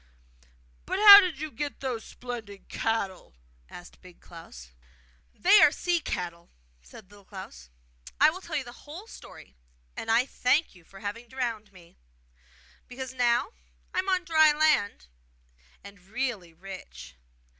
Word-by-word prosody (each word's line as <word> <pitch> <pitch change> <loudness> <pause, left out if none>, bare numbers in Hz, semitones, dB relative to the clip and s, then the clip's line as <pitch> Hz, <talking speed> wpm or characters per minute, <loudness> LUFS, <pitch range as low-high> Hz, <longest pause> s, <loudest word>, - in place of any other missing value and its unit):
'But 375 - -2
how 405 0 +11
did 360 -8 -1
you 310 0 -5
get 290 +4 -5
those 250 -4 -4
splendid 225 -5 -9
cattle?' 195 - -3 0.3
asked 175 0 -13
Big 180 -1 -16
Klaus. 60 - -13 0.6
'They 400 +4 +5
are 295 - +7
sea 350 +2 -1
cattle!' 170 - -6 0.3
said 185 - -16
Little 205 -1 -17
Klaus. 65 - -11 0.5
'I 300 +2 +6
will 370 +3 -9
tell 335 -4 -7
you 285 - -1
the 240 - -11 0.2
whole 335 +8 -9
story, 65 - -14 0.4
and 225 - -7
I 230 +3 +3
thank 275 +4 0
you 180 -3 -19
for 195 +4 -16
having 225 +4 -6
drowned 230 -5 -4
me, 175 -3 -19 0.9
because 260 +1 -8
now 245 +2 +1 0.4
I - - 0
am 375 +1 -2
on 370 -1 +1
dry 315 -2 +5
land 300 - +1 0.8
and 200 -1 -13
really 210 -3 -4
rich! 160 - -11
235 Hz, 145 wpm, -27 LUFS, 190-300 Hz, 0.9 s, how